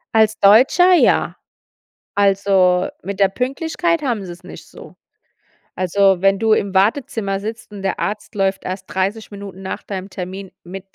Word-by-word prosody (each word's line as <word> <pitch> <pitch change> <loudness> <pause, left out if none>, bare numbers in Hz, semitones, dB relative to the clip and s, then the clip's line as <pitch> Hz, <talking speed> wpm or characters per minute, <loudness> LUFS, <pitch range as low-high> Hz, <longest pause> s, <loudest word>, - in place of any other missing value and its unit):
Als 220 0 +3
Deutscher, 260 - +5
ja. 350 - +3 0.8
Also, 195 -1 +2
mit 200 0 -6
der 195 - +5
Pünktlichkeit 320 - -1
haben 235 -8 -2
sie's 175 -1 -10
nicht - - -11
so. - - -14 0.8
Also 190 0 +2
wenn 195 0 +3
du 220 +1 +2
im 200 -2 +1
Wartezimmer 200 -1 0
sitzt 220 +1 -7
und 200 -2 -8
der 190 - -2
Arzt 210 0 -4
läuft 195 -1 0
erst 185 +1 -5
30 200 +3 -3
Minuten 200 -2 -9
nach 190 - -5
deinem 190 -1 -6
Termin 190 0 -7
mit 195 +2 -11
200 Hz, 155 wpm, -19 LUFS, 190-220 Hz, 0.8 s, Deutscher